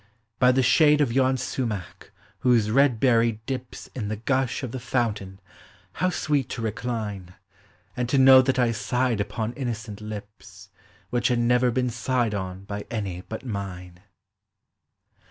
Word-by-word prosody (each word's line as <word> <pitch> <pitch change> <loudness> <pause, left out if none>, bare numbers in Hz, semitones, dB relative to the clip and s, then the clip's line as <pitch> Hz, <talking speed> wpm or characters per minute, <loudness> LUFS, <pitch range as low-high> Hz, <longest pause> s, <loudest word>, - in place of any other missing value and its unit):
" - - -45
By 125 0 +6
the 130 +1 +2
shade 150 +4 +5
of 135 -6 +1
yon 130 0 +3
sumach, 115 -6 -4 0.3
whose 115 -4 +3
red 135 -2 +3
berry 115 -2 +3
dips 130 -2 -5
In 110 -6 -4
the 110 - -2
gush 130 +4 -1
of 125 - -4
the 130 - -5
fountain, 105 -6 -2 0.6
how 185 - +3
sweet 145 -6 -1
to 120 - -5
re 110 - 0
cline, 105 -6 -5 0.6
And 125 -1 -2
to 140 - +2
know 130 0 +8
that 130 0 0
I 120 -2 +3
sighed 120 0 0
upon 110 +3 -3
innocent 115 -5 -5
lips, 100 -2 -10 0.4
Which 120 -1 +1
had 125 - +1
never 125 +1 +3
been 125 +1 0
sighed 120 -2 0
on 95 -1 -5
by 100 +1 -6
any 100 -6 -4
but 110 +4 -6
mine! 90 -5 -6
120 Hz, 160 wpm, -25 LUFS, 105-130 Hz, 0.6 s, know